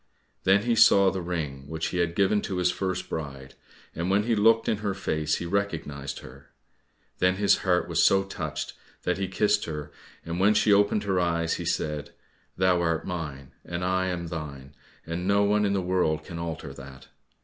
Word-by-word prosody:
Then 95 Hz, +2 st, +4 dB
he 120 Hz, 0 st, +2 dB
saw 100 Hz, -4 st, +6 dB
the 95 Hz, -, -3 dB
ring 75 Hz, -6 st, -4 dB
which 80 Hz, +1 st, -3 dB
he 90 Hz, -, -2 dB
had 85 Hz, -1 st, 0 dB
given 100 Hz, +2 st, +3 dB
to 95 Hz, -, -4 dB
his 90 Hz, 0 st, +2 dB
first 95 Hz, -1 st, -3 dB
bride, 70 Hz, -4 st, -6 dB, 0.4 s
and 85 Hz, +2 st, -2 dB
when 100 Hz, +2 st, +3 dB
he 115 Hz, +1 st, +1 dB
looked 115 Hz, +2 st, +4 dB
in 110 Hz, -, +1 dB
her 100 Hz, -2 st, -2 dB
face 80 Hz, -5 st, -1 dB
he -, -, -4 dB
recognized 80 Hz, -8 st, -3 dB
her. -, -, -14 dB, 0.7 s
Then 90 Hz, 0 st, +3 dB
his 100 Hz, +1 st, +3 dB
heart 90 Hz, -2 st, +1 dB
was 85 Hz, 0 st, +1 dB
so 95 Hz, 0 st, +5 dB
touched 75 Hz, -5 st, -5 dB, 0.3 s
that 90 Hz, +1 st, 0 dB
he 95 Hz, -, -1 dB
kissed 105 Hz, +3 st, +1 dB
her, 75 Hz, -2 st, -6 dB, 0.3 s
and 85 Hz, +1 st, -3 dB
when 105 Hz, +3 st, +4 dB
she 105 Hz, 0 st, +4 dB
opened 100 Hz, +1 st, +3 dB
her 95 Hz, -2 st, +1 dB
eyes 85 Hz, -1 st, 0 dB
he -, -, -5 dB
said, 75 Hz, -1 st, -2 dB, 0.4 s
"Thou 90 Hz, -1 st, +3 dB
art 80 Hz, -2 st, 0 dB
mine, 75 Hz, -7 st, -5 dB
and 85 Hz, +1 st, -4 dB
I 95 Hz, 0 st, +1 dB
am 90 Hz, -2 st, -3 dB
thine, 70 Hz, -4 st, -7 dB, 0.3 s
and 85 Hz, +2 st, -3 dB
no 100 Hz, +1 st, +4 dB
one 105 Hz, +1 st, +2 dB
in 100 Hz, -, +1 dB
the 95 Hz, -, +1 dB
world 90 Hz, -4 st, 0 dB
can 85 Hz, +1 st, -7 dB
alter 80 Hz, -4 st, -5 dB
that." 70 Hz, -1 st, -12 dB
90 Hz, 195 wpm, -27 LUFS, 80-95 Hz, 0.7 s, saw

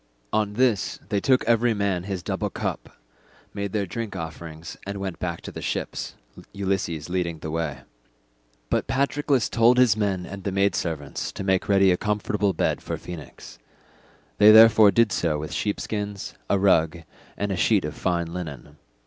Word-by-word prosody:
On 105 Hz, -1 st, +1 dB
this 120 Hz, -3 st, +1 dB
they 105 Hz, -2 st, +1 dB
took 130 Hz, +5 st, +3 dB
every 115 Hz, 0 st, +3 dB
man 100 Hz, -3 st, -1 dB
his 95 Hz, -3 st, -4 dB
double -, -, -2 dB
cup, -, -, -5 dB, 0.6 s
made 100 Hz, -1 st, -3 dB
their 105 Hz, -1 st, -1 dB
drink 110 Hz, +2 st, -5 dB
offerings, 80 Hz, 0 st, -7 dB
and 100 Hz, 0 st, -5 dB
went 95 Hz, -3 st, -5 dB
back 85 Hz, -2 st, -3 dB
to -, -, -8 dB
the -, -, -8 dB
ships, -, -, -4 dB, 0.4 s
Ulysses 95 Hz, -6 st, -2 dB
leading 90 Hz, -2 st, -2 dB
the 80 Hz, 0 st, -6 dB
way. 80 Hz, -4 st, -3 dB, 0.9 s
But -, -, +1 dB
Patroclus 140 Hz, -2 st, +1 dB
told 120 Hz, +2 st, +4 dB
his 125 Hz, -5 st, +5 dB
men 100 Hz, -4 st, -1 dB
and 100 Hz, -1 st, -8 dB
the 100 Hz, -, -2 dB
maid 100 Hz, +1 st, +2 dB
servants 80 Hz, -5 st, -3 dB
to -, -, -5 dB
make 95 Hz, 0 st, 0 dB
ready 95 Hz, -1 st, +5 dB
a 90 Hz, -, +2 dB
comfortable 105 Hz, -1 st, 0 dB
bed -, -, 0 dB
for -, -, -4 dB
Phoenix; 80 Hz, -7 st, -10 dB, 0.8 s
they 105 Hz, -, +8 dB
therefore 110 Hz, -1 st, +8 dB
did 110 Hz, +2 st, +3 dB
so 80 Hz, -5 st, 0 dB
with 75 Hz, +1 st, -6 dB
sheepskins, 105 Hz, -1 st, -3 dB, 0.2 s
a 100 Hz, -, +3 dB
rug, 85 Hz, -4 st, +2 dB, 0.3 s
and 100 Hz, 0 st, -2 dB
a -, -, 0 dB
sheet 95 Hz, 0 st, +2 dB
of 75 Hz, -, -4 dB
fine 85 Hz, -2 st, -2 dB
linen. 75 Hz, -4 st, -7 dB
100 Hz, 170 wpm, -24 LUFS, 85-105 Hz, 0.9 s, they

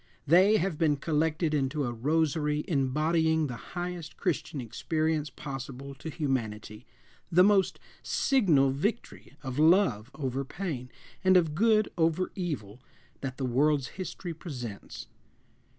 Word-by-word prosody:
They 185 Hz, +8 st, +6 dB
have 175 Hz, -4 st, -1 dB
been 155 Hz, -3 st, +3 dB
collected 155 Hz, +2 st, 0 dB
into 145 Hz, 0 st, 0 dB
a 120 Hz, -2 st, -2 dB
rosary 150 Hz, +3 st, 0 dB
embodying 160 Hz, +3 st, +2 dB
the 125 Hz, -4 st, -4 dB, 0.2 s
highest 175 Hz, -2 st, -5 dB
Christian 165 Hz, -5 st, -2 dB
experience 155 Hz, +5 st, -1 dB
possible 135 Hz, 0 st, -7 dB
to 145 Hz, +4 st, -8 dB
humanity, 115 Hz, -8 st, -3 dB, 0.4 s
the 180 Hz, +2 st, +6 dB
most 200 Hz, -1 st, +3 dB, 0.2 s
signal 165 Hz, -, +3 dB
victory 200 Hz, -, -3 dB
of 130 Hz, 0 st, -4 dB
love 155 Hz, -, +4 dB
over 135 Hz, -2 st, -2 dB
pain 135 Hz, -5 st, -5 dB, 0.3 s
and 185 Hz, 0 st, +6 dB
of 165 Hz, -4 st, +2 dB
good 215 Hz, +4 st, +3 dB
over 165 Hz, +3 st, +1 dB
evil 130 Hz, -, -5 dB, 0.4 s
that 130 Hz, -1 st, -5 dB
the 135 Hz, -, -2 dB
world's 140 Hz, +2 st, +2 dB
history 185 Hz, -2 st, -6 dB
presents. 125 Hz, -, -7 dB
150 Hz, 125 wpm, -29 LUFS, 135-170 Hz, 0.4 s, They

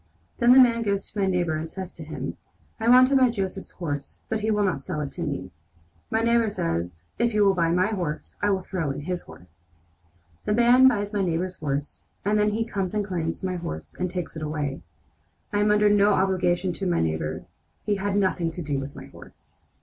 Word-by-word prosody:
Then 240 Hz, +1 st, +5 dB
the 265 Hz, -, +8 dB
man 235 Hz, -2 st, +5 dB
goes 200 Hz, -3 st, -1 dB
to 210 Hz, -, -5 dB
my 195 Hz, -, +2 dB
neighbor 175 Hz, -4 st, +1 dB
and 160 Hz, +1 st, -4 dB
says 190 Hz, +1 st, -7 dB
to -, -, -9 dB
him: -, -, -5 dB, 0.4 s
'I 225 Hz, +1 st, +1 dB
want 255 Hz, +1 st, +7 dB
to 275 Hz, -, +2 dB
buy 260 Hz, -2 st, +5 dB
Joseph's 195 Hz, -4 st, -3 dB
horse, 145 Hz, -5 st, -5 dB
but 220 Hz, -, 0 dB
he 215 Hz, +1 st, -1 dB
would 210 Hz, -1 st, +2 dB
not 180 Hz, -8 st, 0 dB
sell 155 Hz, +2 st, -4 dB
it 140 Hz, -, -4 dB
to 175 Hz, -, -7 dB
me.' 140 Hz, -, -3 dB, 0.6 s
My 225 Hz, -, +1 dB
neighbor 235 Hz, -1 st, +3 dB
says: 85 Hz, -, -3 dB, 0.2 s
'If 235 Hz, -2 st, +1 dB
you 210 Hz, -1 st, +4 dB
will 195 Hz, -, +5 dB
buy 170 Hz, -3 st, +1 dB
my 180 Hz, +4 st, +2 dB
horse, 175 Hz, -8 st, -4 dB
I 205 Hz, -, +2 dB
will 190 Hz, -2 st, 0 dB
throw 170 Hz, -6 st, -2 dB
in 140 Hz, +1 st, -4 dB
his 180 Hz, +3 st, -3 dB
horse!' 85 Hz, 0 st, -17 dB, 0.7 s
The 210 Hz, -, +1 dB
man 245 Hz, +2 st, +6 dB
buys 205 Hz, -4 st, +1 dB
my 205 Hz, -, +1 dB
neighbor's 180 Hz, +1 st, -1 dB
horse, 145 Hz, -1 st, -4 dB, 0.2 s
and 210 Hz, +1 st, +2 dB
then 210 Hz, 0 st, +3 dB
he 220 Hz, +2 st, -1 dB
comes 195 Hz, -3 st, -3 dB
and 210 Hz, -1 st, 0 dB
claims 170 Hz, -4 st, -3 dB
my 185 Hz, -1 st, -1 dB
horse 80 Hz, -, -6 dB
and 180 Hz, 0 st, -2 dB
takes 180 Hz, -2 st, -5 dB
it 160 Hz, -, -6 dB
away. 150 Hz, -3 st, -3 dB, 0.7 s
I 205 Hz, -, +2 dB
am 210 Hz, 0 st, +3 dB
under 210 Hz, 0 st, +4 dB
no 205 Hz, 0 st, +5 dB
obligation 185 Hz, -1 st, +1 dB
to 190 Hz, +2 st, -3 dB
my 175 Hz, -, +1 dB
neighbor. 80 Hz, 0 st, -2 dB, 0.4 s
He 205 Hz, -1 st, +1 dB
had 200 Hz, +1 st, -1 dB
nothing 185 Hz, -4 st, +1 dB
to 175 Hz, -, -6 dB
do 145 Hz, -2 st, -1 dB
with 135 Hz, +1 st, -7 dB
my -, -, -9 dB
horse." -, -, -16 dB
185 Hz, 225 wpm, -25 LUFS, 155-210 Hz, 0.7 s, the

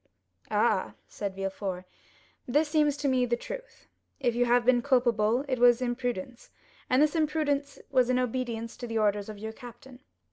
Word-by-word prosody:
"Ah," -, -, +1 dB
said 200 Hz, -2 st, -5 dB
Villefort, 195 Hz, -1 st, -4 dB, 0.6 s
"this 295 Hz, +5 st, +2 dB
seems 300 Hz, -2 st, +2 dB
to 285 Hz, 0 st, -1 dB
me 255 Hz, -2 st, +2 dB
the 240 Hz, -, +1 dB
truth. -, -, -9 dB, 0.3 s
If 245 Hz, -4 st, +1 dB
you 245 Hz, +1 st, +2 dB
have 240 Hz, 0 st, +3 dB
been 245 Hz, -1 st, +4 dB
culpable, 240 Hz, -1 st, +2 dB
it 255 Hz, -2 st, -1 dB
was 240 Hz, 0 st, +6 dB
imprudence, 245 Hz, -2 st, -4 dB, 0.4 s
and 255 Hz, +3 st, +4 dB
this 305 Hz, +2 st, +1 dB
imprudence 300 Hz, -3 st, 0 dB
was 255 Hz, -1 st, +3 dB
in 255 Hz, -, +2 dB
obedience 240 Hz, -2 st, -2 dB
to 245 Hz, -, -6 dB
the 225 Hz, -1 st, -2 dB
orders 205 Hz, -1 st, +1 dB
of 215 Hz, -, -7 dB
your 220 Hz, +2 st, -6 dB
captain. 245 Hz, +1 st, -12 dB
245 Hz, 170 wpm, -28 LUFS, 225-270 Hz, 0.6 s, was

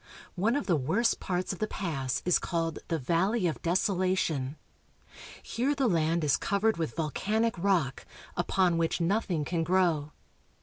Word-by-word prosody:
One 215 Hz, +7 st, +1 dB
of 285 Hz, -, -1 dB
the 175 Hz, -, +2 dB
worst 170 Hz, -, +1 dB
parts 185 Hz, +1 st, -2 dB
of 190 Hz, -, -9 dB
the 215 Hz, -, 0 dB
pass 140 Hz, -12 st, -3 dB
is 180 Hz, -, +4 dB
called 165 Hz, -2 st, -2 dB
the 165 Hz, -, 0 dB
Valley 180 Hz, -, +1 dB
of 165 Hz, -, -1 dB
Deso 185 Hz, +4 st, +1 dB
lation. 165 Hz, -7 st, 0 dB, 0.9 s
Here 270 Hz, +5 st, -1 dB
the 275 Hz, -1 st, +1 dB
land 165 Hz, -3 st, +1 dB
is 145 Hz, -, +3 dB
covered 205 Hz, +1 st, +1 dB
with 160 Hz, -2 st, -3 dB
volcanic 210 Hz, +8 st, 0 dB
rock, 170 Hz, -8 st, 0 dB, 0.3 s
upon 175 Hz, -1 st, +2 dB
which 165 Hz, +1 st, 0 dB
nothing 175 Hz, -3 st, 0 dB
can 165 Hz, 0 st, -1 dB
grow. 165 Hz, -4 st, +1 dB
175 Hz, 160 wpm, -29 LUFS, 160-200 Hz, 0.9 s, is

